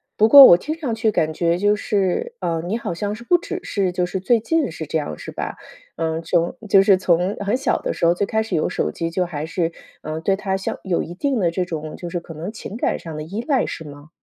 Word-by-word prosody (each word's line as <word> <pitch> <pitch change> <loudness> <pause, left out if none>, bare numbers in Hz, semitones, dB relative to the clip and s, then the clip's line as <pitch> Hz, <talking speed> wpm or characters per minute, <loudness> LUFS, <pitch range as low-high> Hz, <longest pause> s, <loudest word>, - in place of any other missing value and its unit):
不 220 +1 +4
过 280 +1 +12
我 175 - +8
听 300 - -4
上 285 -8 -3
去 225 -1 +1
感 155 -4 0
觉 170 +1 +1
就 205 +3 +2
是， 205 - -1
呃， 165 -1 -1
你 215 +5 -1
好 175 - -4
像 205 +4 -3
是 235 - -11
不 355 - +3
只 365 +2 -2
是 195 -3 -1
就 180 0 0
是 185 +2 -4
最 225 +5 +2
近 295 - 0
是 160 0 -6
这 155 +2 -1
样 145 - -5
是 - - -8
吧？ - - -5 0.4
嗯， 160 0 -2
从 170 +1 0
就 195 0 +6
是 195 -1 +5
从 180 +2 +1
很 205 +4 0
小 265 - 0
的 - - -2
时 - - -1
候 170 - +5
最 190 +3 -1
开 220 0 0
始 225 - -3
有 155 - +1
手 - - -1
机， 165 0 -3
就 180 +2 -1
还 155 -4 -5
是， 165 0 -2 0.3
呃， 155 +1 -4
对 195 +3 +2
它 195 -1 -2
像 195 - -3
有 185 -3 0
一 170 +2 -7
定 270 +3 0
的 175 -3 +2
这 180 +1 -2
种 155 -3 -6
就 175 -1 -7
是 175 - -2
可 165 -1 -11
能 170 +6 -5
情 220 0 -8
感 - - -1
上 160 -2 -8
的 155 - -4
依 195 +8 -5
赖， 275 -4 +2
是 160 - -6
吗？ 145 +1 -12
185 Hz, 285 characters per minute, -21 LUFS, 165-215 Hz, 0.4 s, 过